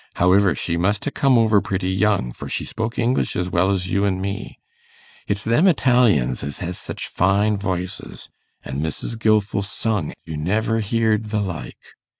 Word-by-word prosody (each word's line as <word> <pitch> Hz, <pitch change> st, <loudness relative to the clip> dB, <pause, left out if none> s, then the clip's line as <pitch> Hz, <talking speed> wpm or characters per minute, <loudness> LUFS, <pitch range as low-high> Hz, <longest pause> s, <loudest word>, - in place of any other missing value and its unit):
Howiver, 90 Hz, -1 st, +4 dB
she 85 Hz, +5 st, -2 dB
must 100 Hz, +4 st, 0 dB
ha' 145 Hz, -, -2 dB
come 135 Hz, -3 st, +3 dB
over 110 Hz, -3 st, +4 dB
pretty 95 Hz, -1 st, -2 dB
young, 100 Hz, -, +1 dB
for -, -, -8 dB
she -, -, -2 dB
spoke 115 Hz, +1 st, -4 dB
English 125 Hz, +2 st, 0 dB
as 90 Hz, 0 st, -2 dB
well 90 Hz, +2 st, +2 dB
as 95 Hz, -2 st, 0 dB
you 100 Hz, +3 st, 0 dB
an' 95 Hz, -2 st, 0 dB
me. 100 Hz, +2 st, -5 dB, 0.7 s
It's 100 Hz, 0 st, -1 dB
them 120 Hz, +12 st, +3 dB
Italians 125 Hz, -, +3 dB
as 70 Hz, 0 st, -4 dB
has 90 Hz, 0 st, -4 dB
such -, -, -5 dB
fine 100 Hz, +3 st, +2 dB
voices, 95 Hz, -1 st, -4 dB, 0.4 s
an' 65 Hz, +1 st, -4 dB
Mrs. 80 Hz, +8 st, -3 dB
Gilfil 105 Hz, -3 st, +2 dB
sung, 105 Hz, +1 st, -2 dB
you 80 Hz, -, -6 dB
never 110 Hz, +8 st, 0 dB
heared 110 Hz, 0 st, +1 dB
the 105 Hz, 0 st, -1 dB
like. 95 Hz, -5 st, -5 dB
100 Hz, 170 wpm, -21 LUFS, 90-110 Hz, 0.7 s, Howiver